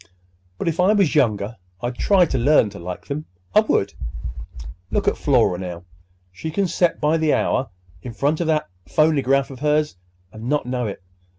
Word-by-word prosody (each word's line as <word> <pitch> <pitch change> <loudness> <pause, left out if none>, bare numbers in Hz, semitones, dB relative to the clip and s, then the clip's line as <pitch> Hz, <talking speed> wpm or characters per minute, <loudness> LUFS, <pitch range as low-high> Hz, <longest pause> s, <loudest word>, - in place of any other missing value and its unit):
But - - -4
if 165 +1 -1
I 185 +4 +5
was 195 -8 +3
younger 110 -6 +1 0.2
I'd 120 +4 -3
try 185 +7 +4
to 135 - -2
learn 120 -4 +4
to 100 - -10
like 90 - -7
'em. 150 +2 -3 0.3
I - - +7
would! 100 - +1 1.0
Look - - -1
at - - +3
Flora, 90 - +2
now. 90 -2 -6 0.5
She 125 - -6
can 195 +5 0
set 175 0 +1
by 155 +2 +2
the 160 -2 +2
hour 130 - 0 0.3
in 125 - -7
front 150 +6 +1
of 170 - -1
that 155 -1 +1 0.2
phonygraph 140 - +2
of 130 - -10
hers, 150 -5 +1 0.3
and 110 +3 -7
not 150 -2 +1
know 125 -2 -2
it!" 100 -2 -7
140 Hz, 185 wpm, -22 LUFS, 110-160 Hz, 1.0 s, I